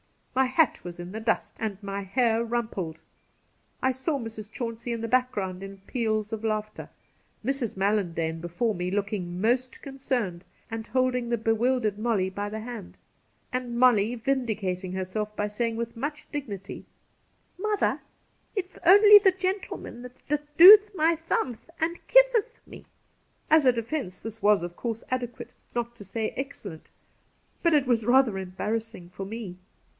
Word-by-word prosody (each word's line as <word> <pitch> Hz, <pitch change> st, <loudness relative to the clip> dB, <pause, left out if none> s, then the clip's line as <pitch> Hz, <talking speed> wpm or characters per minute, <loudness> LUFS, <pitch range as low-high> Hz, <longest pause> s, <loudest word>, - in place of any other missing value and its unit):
My 265 Hz, +1 st, +3 dB
hat 260 Hz, +5 st, +2 dB
was 175 Hz, -1 st, -7 dB
in 175 Hz, +1 st, -7 dB
the 220 Hz, -, -5 dB
dust 225 Hz, +1 st, -1 dB
and 215 Hz, -3 st, -2 dB
my 200 Hz, 0 st, -3 dB
hair 225 Hz, +3 st, +1 dB
rumpled. 220 Hz, -9 st, -3 dB, 0.9 s
I 260 Hz, -, +4 dB
saw 265 Hz, +4 st, -2 dB
Mrs. 225 Hz, -4 st, -7 dB
Chauncey 235 Hz, 0 st, -5 dB
in 230 Hz, -, -4 dB
the 230 Hz, -, -2 dB
background 210 Hz, -7 st, 0 dB
in 195 Hz, 0 st, -9 dB
peals 215 Hz, -1 st, -2 dB
of 220 Hz, 0 st, -4 dB
laughter; 215 Hz, -1 st, -3 dB, 0.6 s
Mrs. 265 Hz, -6 st, -1 dB
Mallandane 175 Hz, -5 st, 0 dB
before 175 Hz, +7 st, -1 dB
me, 180 Hz, -1 st, -3 dB
looking 195 Hz, -3 st, -2 dB
most 250 Hz, +5 st, 0 dB
concerned, 255 Hz, -10 st, -3 dB, 0.3 s
and 225 Hz, 0 st, -5 dB
holding 255 Hz, -2 st, 0 dB
the 235 Hz, -, +1 dB
bewUdered 225 Hz, -1 st, +1 dB
Molly 215 Hz, -5 st, 0 dB
by 205 Hz, +2 st, -4 dB
the 215 Hz, +1 st, -5 dB
hand; 225 Hz, -5 st, -8 dB, 0.6 s
and 250 Hz, -2 st, -3 dB
Molly 240 Hz, -2 st, +4 dB
vindicating 215 Hz, -8 st, -2 dB
herself 205 Hz, +3 st, -3 dB
by 210 Hz, -, -1 dB
saying 230 Hz, +2 st, -2 dB
with 230 Hz, 0 st, -4 dB
much 295 Hz, +5 st, -5 dB
dignity: 210 Hz, -, -6 dB, 0.4 s
' -, -, -40 dB
Mother, 420 Hz, 0 st, 0 dB, 0.5 s
it's 375 Hz, -2 st, -4 dB
only 410 Hz, +4 st, +9 dB
the 385 Hz, -2 st, +4 dB
gentimeU 370 Hz, -10 st, -4 dB, 0.2 s
that 295 Hz, 0 st, -3 dB
dooth 410 Hz, +4 st, +10 dB
my 330 Hz, 0 st, +3 dB
thumth 310 Hz, -6 st, -3 dB
an' 335 Hz, +1 st, 0 dB
kitheth -, -, +4 dB
me.' -, -, -13 dB, 0.6 s
As 310 Hz, -3 st, +6 dB
a -, -, +8 dB
defence 230 Hz, -4 st, -4 dB
this 225 Hz, 0 st, -8 dB
was, 205 Hz, -4 st, +4 dB
of 175 Hz, 0 st, -6 dB
course, 230 Hz, -1 st, -4 dB
adequate 245 Hz, -2 st, -4 dB, 0.2 s
— -, -, -35 dB
not 235 Hz, 0 st, -2 dB
to 205 Hz, -, -10 dB
say 220 Hz, +3 st, -3 dB
excellent; 220 Hz, -, -7 dB, 0.7 s
but 335 Hz, -2 st, +4 dB
it 285 Hz, -2 st, +3 dB
was 235 Hz, -3 st, +2 dB
rather 245 Hz, -4 st, +3 dB
embarrassing 200 Hz, +1 st, -4 dB
for 190 Hz, +2 st, -7 dB
Biie. 210 Hz, -4 st, -6 dB
230 Hz, 155 wpm, -27 LUFS, 205-260 Hz, 0.9 s, dooth